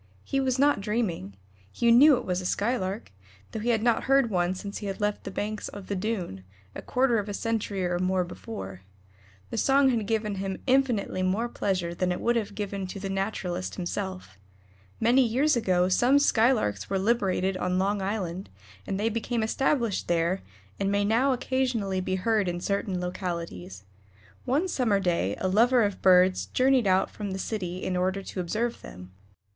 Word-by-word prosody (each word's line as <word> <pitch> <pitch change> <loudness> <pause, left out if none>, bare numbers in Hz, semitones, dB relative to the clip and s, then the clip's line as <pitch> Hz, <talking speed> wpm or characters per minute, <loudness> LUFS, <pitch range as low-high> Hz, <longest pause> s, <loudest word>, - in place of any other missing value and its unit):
He 275 - -1
was 260 -1 0
not 285 -5 +3
dreaming; 195 - -2 0.4
he 235 0 +2
knew 270 +4 +7
it 245 - -6
was 180 0 -1
a - - -8
Skylark, 205 - -2 0.4
though - - -4
he 230 +3 -2
had 225 -2 +2
not 235 -1 +2
heard 270 -3 +3
one 180 -1 +1
since 200 +2 -6
he 205 - -5
had 195 - -4
left 205 0 -1
the - - -3
banks 210 +2 -4
of 200 -1 -9
the 200 - -1
Doon, 185 - -3 0.3
a - - -7
quarter 250 -3 +1
of 205 0 -5
a 205 - -3
century 210 -4 -2
or 175 0 -1
more 185 0 +1
before. 95 - -8 0.7
The 230 - -1
song 270 +2 +4
had 225 -5 0
given 215 -2 -1
him 190 0 -3
infinitely 255 -8 +1
more 195 +6 0
pleasure 185 -7 -2
than 180 +1 -1
it 180 - -2
would 240 +1 +1
have 210 -3 -2
given 200 -2 -4
to 195 - -7
the 195 0 -4
naturalist 195 -2 -3
himself. 185 - -5 0.6
Many 240 +4 +4
years 260 +6 +2
ago 185 -6 +2
some 245 +9 +4
Skylarks 220 - +2
were 195 - 0
liberated 195 -3 +1
on 180 0 -1
Long 200 +2 0
Island, 190 -2 -3 0.4
and 195 - -2
they 215 - +1
became 230 +1 -1
established 235 -2 0
there, 170 +2 +1 0.4
and 195 0 0
may 200 0 +1
now 235 +6 +3
occasionally 245 -7 -1
be 185 0 -1
heard 210 +1 +1
in 175 0 -2
certain 200 0 -2
localities. 170 - -5 0.6
One 295 +9 +1
summer 235 - +1
day 170 - 0
a 185 - 0
lover 235 +5 +4
of 205 -2 -2
birds 185 0 +4
journeyed 255 -3 +2
out 190 0 +2
from 205 -3 -5
the - - -3
city 185 -3 -4
in 185 - -1
order 185 +2 0
to 190 - -7
observe 220 +7 -2
them. 90 +1 -11
200 Hz, 185 wpm, -27 LUFS, 185-235 Hz, 0.7 s, knew